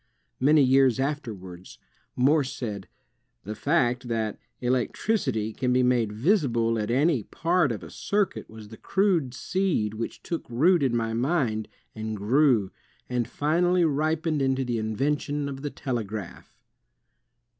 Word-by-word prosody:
Many 145 +2 +5
years 130 -1 +4
afterwards, 105 -11 -5 0.4
Morse 135 +1 +3
said: 105 -6 -5 0.6
'^The 105 +2 -5
fact 125 -4 +1
that... 110 -3 -2 0.2
electricity 125 - 0
can 125 +2 -1
be 125 0 +3
made 120 -4 +2
visible 115 - +1
at 105 0 -2
any... 135 +2 +2
part 165 - +1
of 110 - -5
a - - -10
circuit 205 -2 -1
was 110 -1 -11
the 110 - -11
crude 175 -10 +1
seed 175 - -1
which 115 +1 -6
took 170 -6 -5
root 160 +9 +3
in 130 -4 +1
my 115 -1 -1
mind, 120 -4 0 0.3
and 110 -1 -4
grew..., 115 -1 +3 0.4
and 125 -2 -1
finally 175 +4 +2
ripened 155 +1 0
into 135 0 +1
the 120 -2 -1
invention 145 +6 -1
of 135 -1 -6
the 145 - -3
telegraph." 110 -9 -5
130 Hz, 135 wpm, -26 LUFS, 110-150 Hz, 0.6 s, Many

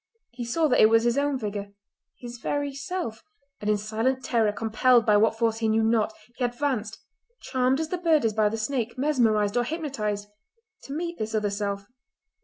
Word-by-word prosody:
He 240 0 -6
saw 310 +7 +1
that 265 - +2
it 215 - +7
was 225 0 +4
his 240 0 +2
own 285 -1 +1
figure, 205 -3 -5 0.4
his 240 -1 -9
very 285 +2 -2
self, 275 -5 -5 0.4
and 210 - -3
in 210 - +3
silent 225 +5 -1
terror, 225 -3 +2
compelled 225 +3 +3
by 210 - +4
what 220 +2 +3
force 225 -1 +1
he 225 - 0
knew 220 +1 +2
not, 220 -1 +2 0.3
he 255 - -2
advanced—charmed 255 - -2
as 320 -1 -2
the 360 - -2
bird 320 -7 +3
is 220 - +1
by 215 -1 +3
the 225 - -3
snake, 235 +1 -2
mesmerised 230 -7 +2
or 240 - +3
hypnotised—to 255 - -6
meet 340 +2 -4
this 220 0 -3
other 210 -1 0
self. 200 -1 -3
230 Hz, 185 wpm, -26 LUFS, 215-275 Hz, 0.4 s, it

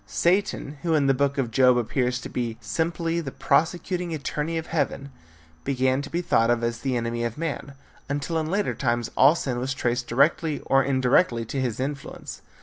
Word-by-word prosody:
Satan, 150 - 0
who 165 -2 +1
in 145 -2 +3
the 135 - +4
book 140 +1 0
of 125 -4 -1
Job 125 +1 +5
appears 125 +1 0
to - - -6
be 115 -2 -3
simply 165 +10 -1
the 145 - -5
prosecuting 175 +3 0
attorney 150 +2 -3
of 160 - -3
heaven, 140 -4 -2 0.5
began 130 0 +1
to 145 - -7
be 175 +1 -2
thought 115 -7 +3
of 120 -1 +2
as 115 0 -1
the 130 -2 -1
enemy 120 0 -2
of 120 +1 -3
man, 150 -3 -4 0.3
until 145 +4 -1
in 155 0 -2
later 200 +3 0
times 120 -2 -1
all 140 +5 +6
sin 130 -7 -2
was 130 +2 -2
traced 120 -1 -1
directly 145 +4 +2
or 135 0 +3
indirectly 130 -1 +2
to 135 +4 -3
his 125 -3 -2
influence. 140 +1 -5
135 Hz, 190 wpm, -25 LUFS, 120-160 Hz, 0.5 s, all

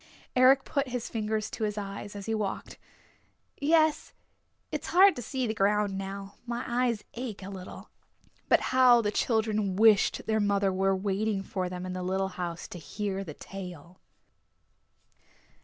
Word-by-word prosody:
Eric 260 +1 +6
put 280 -1 -1
his 245 -2 -4
fingers 215 -1 -2
to 220 - -4
his 210 -1 -1
eyes 200 0 -6
as 200 -1 -6
he 225 - -1
walked. 210 -3 -3 0.8
"Yes, 310 +1 +2 0.6
it's - - -4
hard 385 +2 +6
to 245 - -5
see 260 +1 -2
the 220 - -1
ground 205 -1 +1
now. 195 +1 -6
My 235 0 -3
eyes 240 -2 0
ache 235 -5 -6
a 195 - -7
little." 185 -2 -9 0.6
But - - +5
how 250 -2 +7
the 205 - 0
children 215 -4 0
wished 215 0 +4
their 220 0 +1
mother 200 -2 +2
were 195 +1 +2
waiting 200 +1 -1
for 185 -1 -3
them 180 0 -5
in 185 - -4
the 185 - -4
little 190 +1 -1
house 175 -2 -5
to 175 - -8
hear 195 +5 -4
the 155 -6 -8
tale! 180 -2 -9
205 Hz, 160 wpm, -29 LUFS, 195-235 Hz, 0.8 s, how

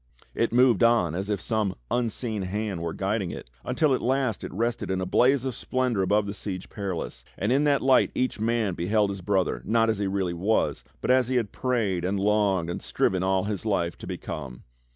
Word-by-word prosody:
It 115 - 0
moved 125 -2 +4
on 115 -9 +4
as 95 +4 -3
if 105 -2 0
some 110 -2 -1 0.2
unseen 115 -2 -1
hand 100 -1 -3
were 85 -1 -2
guiding 95 +1 -1
it - - -8
until 150 -4 +2
at 130 - 0
last 130 -3 0
it - - -5
rested 115 +4 -2
in 95 0 0
a 95 - -1
blaze 130 +7 +3
of 130 - -1
splendor 125 -3 -1
above 100 +2 +2
the 100 - -4
Siege 95 -2 -6
Perilous, 95 -5 -4
and 100 +4 0
in 140 +3 +3
that 145 -1 +2
light 130 -1 +5
each 130 -4 -1
man 110 -3 +1
beheld 100 +4 +1
his 100 -1 -6
brother 95 0 0
not 115 0 +2
as 110 - -3
he 100 - 0
really 95 -2 -1
was, 100 +6 0 0.2
but - - +1
as 130 -1 +4
he 130 - -1
had 115 -5 0
prayed 110 -9 0
and 95 +2 0
longed 100 -4 +2
and 85 - -4
striven 95 -1 0
all 95 0 +1
his 105 -1 -3
life 90 -6 0
to - - -8
become. 70 -7 -6
105 Hz, 215 wpm, -26 LUFS, 95-120 Hz, 0.2 s, light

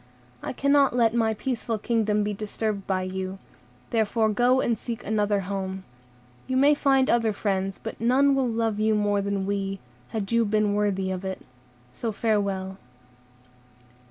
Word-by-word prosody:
I - - -4
cannot 280 0 +3
let 230 -2 +3
my 225 -2 +1
peaceful 235 -1 -2
kingdom 215 -1 +1
be 210 0 -1
disturbed 210 0 -3
by 185 -1 0
you; 190 0 -4 0.5
therefore 220 0 +2
go 245 +4 +3
and 235 -3 +1
seek 230 +1 -6
another 205 -1 +1
home. 190 0 -4 0.6
You 260 - 0
may 285 +3 +6
find 270 -2 +3
other 230 -2 +2
friends, 195 -2 -2
but 225 - -8
none 265 +4 +4
will 270 -2 +1
love 225 -2 -1
you 215 0 +2
more 205 -1 +1
than 200 -1 -2
we, 195 -1 -2 0.3
had 210 -2 -4
you 230 0 +4
been 210 -1 +1
worthy 195 -2 0
of 185 0 -4
it; 190 -1 -5 0.5
so 230 - -3
farewell." 200 -3 -1
215 Hz, 155 wpm, -26 LUFS, 195-230 Hz, 0.6 s, may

